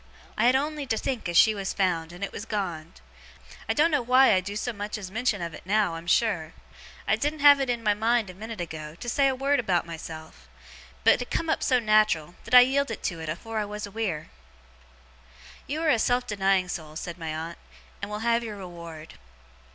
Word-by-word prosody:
I -, -, +1 dB
had 255 Hz, -, +5 dB
on'y 295 Hz, +1 st, -1 dB
to 225 Hz, -, 0 dB
think 230 Hz, -6 st, -3 dB
as 170 Hz, -, +1 dB
she 220 Hz, -, +7 dB
was 195 Hz, -2 st, -3 dB
found, 170 Hz, -4 st, 0 dB
and 175 Hz, +3 st, -8 dB
it 200 Hz, -, -3 dB
was -, -, -6 dB
gone. 175 Hz, -6 st, -4 dB, 0.8 s
I -, -, +3 dB
doen't 320 Hz, +3 st, +3 dB
know 290 Hz, -3 st, +2 dB
why 255 Hz, +1 st, +5 dB
I 190 Hz, -, +4 dB
do 200 Hz, +2 st, -6 dB
so 240 Hz, +3 st, -2 dB
much 205 Hz, +1 st, -5 dB
as 190 Hz, -3 st, -8 dB
mention 220 Hz, -3 st, -1 dB
of 170 Hz, -1 st, -5 dB
it -, -, -9 dB
now, 200 Hz, -1 st, +1 dB
I'm 165 Hz, +1 st, -8 dB
sure. 170 Hz, -5 st, +1 dB, 0.5 s
I -, -, +4 dB
didn't 300 Hz, 0 st, -2 dB
have 285 Hz, -1 st, +8 dB
it 270 Hz, -2 st, -1 dB
in 240 Hz, -2 st, -1 dB
my 210 Hz, -1 st, +3 dB
mind 225 Hz, +1 st, +1 dB
a 185 Hz, -, -9 dB
minute 220 Hz, +3 st, -8 dB
ago, 155 Hz, -2 st, -6 dB
to 240 Hz, -, -9 dB
say 275 Hz, +3 st, +3 dB
a 265 Hz, -, +1 dB
word 275 Hz, +2 st, +1 dB
about 190 Hz, -7 st, +1 dB
myself; 160 Hz, -, -9 dB, 0.5 s
but -, -, +5 dB
it 245 Hz, -, -6 dB
come 330 Hz, -1 st, -1 dB
up -, -, 0 dB
so 255 Hz, -, +3 dB
nat'ral, 215 Hz, -8 st, +2 dB
that -, -, +2 dB
I 250 Hz, -, +12 dB
yielded 265 Hz, -3 st, 0 dB
to 170 Hz, -3 st, -2 dB
it 160 Hz, -, -5 dB
afore 220 Hz, +8 st, -4 dB
I 210 Hz, -, -1 dB
was 210 Hz, +1 st, -5 dB
aweer.' 200 Hz, -7 st, -4 dB, 1.4 s
'You 305 Hz, +3 st, -3 dB
are 320 Hz, -, +2 dB
a 235 Hz, -, +4 dB
self 245 Hz, +2 st, +1 dB
denying 195 Hz, -4 st, +1 dB
soul,' 160 Hz, -4 st, -6 dB
said 170 Hz, +2 st, -6 dB
my 160 Hz, -1 st, -4 dB
aunt, 165 Hz, +2 st, -6 dB, 0.4 s
'and 200 Hz, -, -4 dB
will 210 Hz, +2 st, -4 dB
have 235 Hz, 0 st, +2 dB
your 215 Hz, -3 st, -6 dB
reward. 170 Hz, -4 st, -10 dB
210 Hz, 220 wpm, -26 LUFS, 170-245 Hz, 1.4 s, I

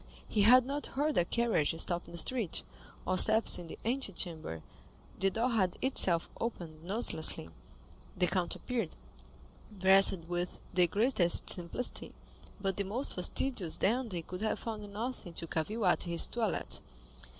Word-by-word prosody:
He 210 Hz, -, 0 dB
had 245 Hz, +4 st, +7 dB
not 285 Hz, +2 st, -3 dB
heard 300 Hz, +2 st, +1 dB
a -, -, +3 dB
carriage 190 Hz, -9 st, 0 dB
stop 175 Hz, 0 st, 0 dB
in -, -, -12 dB
the -, -, -6 dB
street, 225 Hz, 0 st, 0 dB, 0.4 s
or 185 Hz, 0 st, +1 dB
steps 220 Hz, 0 st, +4 dB
in 175 Hz, -, -8 dB
the -, -, -9 dB
antechamber; 175 Hz, -, -3 dB, 0.6 s
the 195 Hz, -, +2 dB
door 230 Hz, +5 st, -1 dB
had 190 Hz, -6 st, +1 dB
itself 185 Hz, -10 st, +4 dB
opened 170 Hz, -9 st, -5 dB
noiselessly. 170 Hz, -, +1 dB, 0.7 s
The 180 Hz, -, +3 dB
count 180 Hz, -1 st, -1 dB
appeared, 230 Hz, -10 st, -3 dB, 0.8 s
dressed 190 Hz, -1 st, +5 dB
with 175 Hz, +1 st, -3 dB
the 180 Hz, -1 st, +4 dB
greatest 200 Hz, -2 st, +3 dB
simplicity, 180 Hz, +8 st, -2 dB, 0.4 s
but 195 Hz, -1 st, -2 dB
the 200 Hz, -, 0 dB
most 225 Hz, +8 st, 0 dB
fastidious 185 Hz, -1 st, -1 dB
dandy 220 Hz, -5 st, -1 dB
could 180 Hz, +3 st, -7 dB
have 220 Hz, -, -1 dB
found 210 Hz, -3 st, -6 dB
nothing 220 Hz, -4 st, -5 dB
to 165 Hz, -, -6 dB
cavil 200 Hz, +8 st, -2 dB
at 180 Hz, 0 st, +2 dB
in 170 Hz, -, -3 dB
his 170 Hz, -, +3 dB
toilet. 225 Hz, -5 st, -2 dB
195 Hz, 150 wpm, -32 LUFS, 175-235 Hz, 0.8 s, had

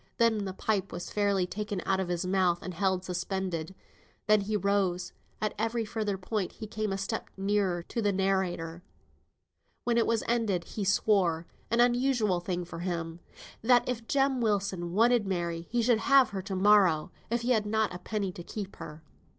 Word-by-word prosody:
Then 220 Hz, -3 st, +2 dB
the 190 Hz, -, -4 dB
pipe 200 Hz, 0 st, -1 dB
was 175 Hz, -, -6 dB
fairly 200 Hz, -3 st, +2 dB
taken 205 Hz, +1 st, -4 dB
out 195 Hz, -1 st, +1 dB
of 190 Hz, -, -1 dB
his 175 Hz, 0 st, -2 dB
mouth, 180 Hz, -2 st, +1 dB
and 185 Hz, -, -5 dB
held 185 Hz, +1 st, 0 dB
suspended. 185 Hz, -1 st, -3 dB, 0.5 s
Then 215 Hz, 0 st, +4 dB
he 210 Hz, +2 st, -1 dB
rose, 195 Hz, -3 st, 0 dB, 0.3 s
and 215 Hz, -1 st, -1 dB
at 215 Hz, -, -3 dB
every 230 Hz, 0 st, 0 dB
further 210 Hz, -2 st, -2 dB
point 195 Hz, 0 st, -3 dB
he 220 Hz, -, -7 dB
came 215 Hz, -1 st, -3 dB
a 195 Hz, -, -1 dB
step 195 Hz, 0 st, -3 dB
nearer 195 Hz, -3 st, 0 dB
to 230 Hz, -, -3 dB
the 205 Hz, -1 st, +2 dB
narrator. 185 Hz, -3 st, -1 dB, 1.0 s
When 235 Hz, -1 st, +2 dB
it 230 Hz, -, +2 dB
was 230 Hz, -1 st, +1 dB
ended, 220 Hz, -7 st, +1 dB
he 205 Hz, -, -5 dB
swore 185 Hz, -5 st, +2 dB, 0.2 s
(an 235 Hz, -, +1 dB
unusual 240 Hz, -6 st, +2 dB
thing 175 Hz, 0 st, -3 dB
for 165 Hz, -, -8 dB
him) 170 Hz, -2 st, -3 dB, 0.4 s
that 245 Hz, +1 st, +4 dB
if 235 Hz, -2 st, -3 dB
Jem 270 Hz, -2 st, +2 dB
Wilson 195 Hz, -5 st, 0 dB
wanted 230 Hz, +1 st, +4 dB
Mary 170 Hz, -2 st, -2 dB
he 240 Hz, 0 st, +1 dB
should 230 Hz, -1 st, +3 dB
have 275 Hz, +1 st, +5 dB
her 195 Hz, -2 st, -3 dB
to 195 Hz, 0 st, -5 dB
morrow, 185 Hz, -5 st, +4 dB, 0.2 s
if 235 Hz, +1 st, 0 dB
he 245 Hz, +2 st, 0 dB
had 215 Hz, -4 st, +2 dB
not 220 Hz, -2 st, +1 dB
a 180 Hz, -, -6 dB
penny 200 Hz, 0 st, -2 dB
to 175 Hz, -, -9 dB
keep 200 Hz, +1 st, -7 dB
her. 160 Hz, -1 st, -9 dB
195 Hz, 190 wpm, -29 LUFS, 180-220 Hz, 1.0 s, have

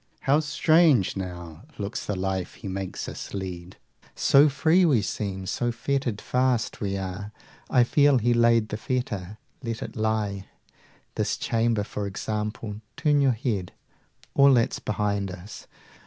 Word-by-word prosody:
How 140 Hz, +2 st, +3 dB
strange 155 Hz, -, +3 dB
now 85 Hz, -3 st, -6 dB, 0.2 s
looks 100 Hz, 0 st, -4 dB
the 105 Hz, -, -1 dB
life 95 Hz, -1 st, -3 dB
He -, -, -9 dB
makes 95 Hz, 0 st, -4 dB
us -, -, -7 dB
lead; 90 Hz, -2 st, -6 dB, 0.2 s
50 -, -, -26 dB
So 145 Hz, +2 st, +5 dB
free 160 Hz, +6 st, +3 dB
we 135 Hz, -, +3 dB
seem, 95 Hz, -2 st, -3 dB
so 120 Hz, +5 st, -1 dB
fettered 120 Hz, -2 st, -2 dB
fast 125 Hz, -2 st, 0 dB
we 100 Hz, -1 st, -1 dB
are! 95 Hz, +2 st, -5 dB, 0.4 s
I 125 Hz, -, +5 dB
feel 145 Hz, +2 st, +4 dB
He 120 Hz, +1 st, +2 dB
laid 115 Hz, -2 st, +3 dB
the 105 Hz, -, -3 dB
fetter: 110 Hz, -6 st, -3 dB, 0.2 s
let 115 Hz, -3 st, -4 dB
it -, -, -8 dB
lie! 110 Hz, -3 st, -1 dB, 0.7 s
This -, -, -1 dB
chamber 115 Hz, -2 st, +1 dB
for 100 Hz, 0 st, -4 dB
example 105 Hz, +2 st, -4 dB, 0.2 s
turn 145 Hz, -1 st, +3 dB
your 135 Hz, -2 st, +4 dB
head 110 Hz, -6 st, -3 dB, 0.6 s
All 140 Hz, -1 st, +6 dB
that's 115 Hz, -1 st, +1 dB
behind 100 Hz, -2 st, -1 dB
us! 90 Hz, +3 st, -10 dB
110 Hz, 150 wpm, -26 LUFS, 95-125 Hz, 0.7 s, All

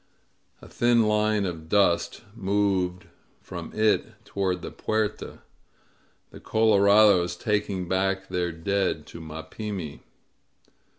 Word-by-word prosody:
A -, -, -11 dB
thin 120 Hz, -1 st, +3 dB
line 105 Hz, -1 st, +1 dB
of 80 Hz, -3 st, -6 dB
dust 100 Hz, +1 st, +2 dB
moved 95 Hz, -3 st, 0 dB, 0.3 s
from -, -, -8 dB
it 110 Hz, 0 st, +1 dB
toward 95 Hz, -2 st, -2 dB
the -, -, -6 dB
Puerta 110 Hz, -1 st, -3 dB, 0.4 s
— -, -, -38 dB
the -, -, -11 dB
colorados 100 Hz, -4 st, +4 dB
taking 100 Hz, -2 st, -1 dB
back 95 Hz, +1 st, 0 dB
their 90 Hz, -1 st, -1 dB
dead 95 Hz, +4 st, -1 dB
to 85 Hz, -, -10 dB
Mapimi. 80 Hz, +2 st, -6 dB
100 Hz, 110 wpm, -26 LUFS, 90-105 Hz, 0.4 s, colorados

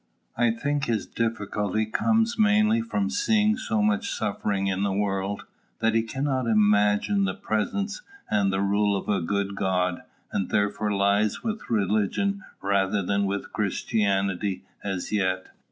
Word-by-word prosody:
I 120 Hz, -1 st, +3 dB
think 145 Hz, +5 st, -1 dB
his 115 Hz, -3 st, -1 dB
difficulty 110 Hz, -2 st, -1 dB
comes 225 Hz, -, +1 dB
mainly 215 Hz, +1 st, +4 dB
from 220 Hz, -2 st, -1 dB
seeing 215 Hz, -2 st, +2 dB
so 230 Hz, -3 st, -1 dB
much 215 Hz, +2 st, +1 dB
suffering 100 Hz, -1 st, -1 dB
in 95 Hz, 0 st, 0 dB
the 100 Hz, -1 st, +1 dB
world, 100 Hz, 0 st, -1 dB, 0.3 s
that 115 Hz, -1 st, +1 dB
he 115 Hz, -, +3 dB
cannot 130 Hz, +2 st, -2 dB
imagine 105 Hz, -, +3 dB
the -, -, -2 dB
presence 200 Hz, -, -2 dB, 0.3 s
and 100 Hz, -2 st, +2 dB
rule 100 Hz, +1 st, +1 dB
of -, -, -6 dB
a 100 Hz, -3 st, +1 dB
good 100 Hz, +3 st, -1 dB
God, 90 Hz, -2 st, 0 dB, 0.3 s
and 95 Hz, -, -1 dB
therefore 105 Hz, +1 st, 0 dB
lies 100 Hz, +1 st, +1 dB
with 220 Hz, -1 st, -4 dB
religion 110 Hz, -, 0 dB, 0.2 s
rather 100 Hz, 0 st, +1 dB
than 100 Hz, +2 st, +1 dB
with 100 Hz, +1 st, -4 dB
Christianity 100 Hz, -2 st, 0 dB, 0.2 s
as 95 Hz, -3 st, -3 dB
yet. 95 Hz, -3 st, 0 dB
105 Hz, 140 wpm, -26 LUFS, 100-145 Hz, 0.3 s, mainly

